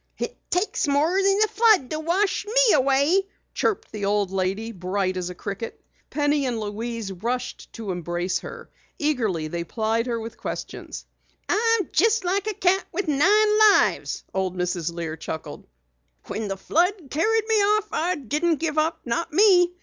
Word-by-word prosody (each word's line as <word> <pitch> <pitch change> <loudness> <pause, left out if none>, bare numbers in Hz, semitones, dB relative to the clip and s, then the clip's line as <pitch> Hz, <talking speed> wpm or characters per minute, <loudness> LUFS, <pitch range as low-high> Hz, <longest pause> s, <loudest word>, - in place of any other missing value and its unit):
"It - - -4
takes 360 -3 0
more 310 +7 +2
than 390 0 +3
a - - -5
flood 430 - +3
to 310 - -2
wash 375 +6 0
me - - +4
away!" 280 +8 +3 0.3
chirped 425 - -1
the 210 -2 -4
old 200 -1 +1
lady, 195 +4 -2
bright 185 -1 -2
as 180 -1 -3
a 180 - -8
cricket. 200 +4 -6 0.3
Penny 290 -2 +1
and 235 -3 -2
Louise 220 0 -4
rushed 240 +7 -4
to 220 -4 -5
embrace 175 +1 -2
her. - - -10 0.3
Eagerly 225 - 0
they 170 +2 -4
plied 225 +5 -1
her 235 -1 -1
with 225 +1 -8
questions. - - -6 0.4
"I'm 455 -2 +1
jest 450 -3 +2
like 390 +3 0
a 430 - -2
cat 380 +2 +2
with 390 -3 -3
nine 420 +9 +4
lives," 400 - +2
old 190 -1 -2
Mrs. 175 -2 -1
Lear 165 -2 -4
chuckled. 160 0 -7 0.6
"When 220 -1 -4
the 195 -1 -3
flood 345 - 0
carried 440 +8 +1
me 445 - +2
off, 425 +1 +2
I 355 +3 0
didn't 305 +4 0
give 310 0 -1
up 320 +1 0
not 330 +8 -2
me. 360 0 +5
285 Hz, 165 wpm, -24 LUFS, -, 0.6 s, me